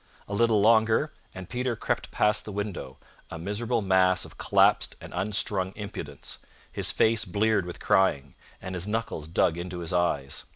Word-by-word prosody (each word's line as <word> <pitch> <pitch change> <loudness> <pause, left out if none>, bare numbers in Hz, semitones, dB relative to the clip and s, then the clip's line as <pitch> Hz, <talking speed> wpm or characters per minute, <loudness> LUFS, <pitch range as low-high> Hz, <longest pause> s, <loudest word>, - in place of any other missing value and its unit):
A 100 - -6
little 110 0 +3
longer, 110 +6 +3 0.2
and 95 -1 -8
Peter 125 -1 -2
crept - - -2
past 105 0 +2
the 105 - -7
window, 100 -10 -5 0.3
a - - -6
miserable 110 +6 -2
mass 95 -1 +3
of - - -13
collapsed - - +3
and - - -11
unstrung 95 0 0
impudence, 85 -9 -7 0.3
his - - 0
face 115 0 +3
bleared 105 0 +1
with 90 - -7
crying, 70 -8 +2 0.3
and 95 -1 -7
his 90 +1 0
knuckles 105 -8 -3
dug 85 0 +1
into 90 +1 -5
his 85 0 -4
eyes. 70 -6 0
95 Hz, 165 wpm, -27 LUFS, 90-110 Hz, 0.3 s, little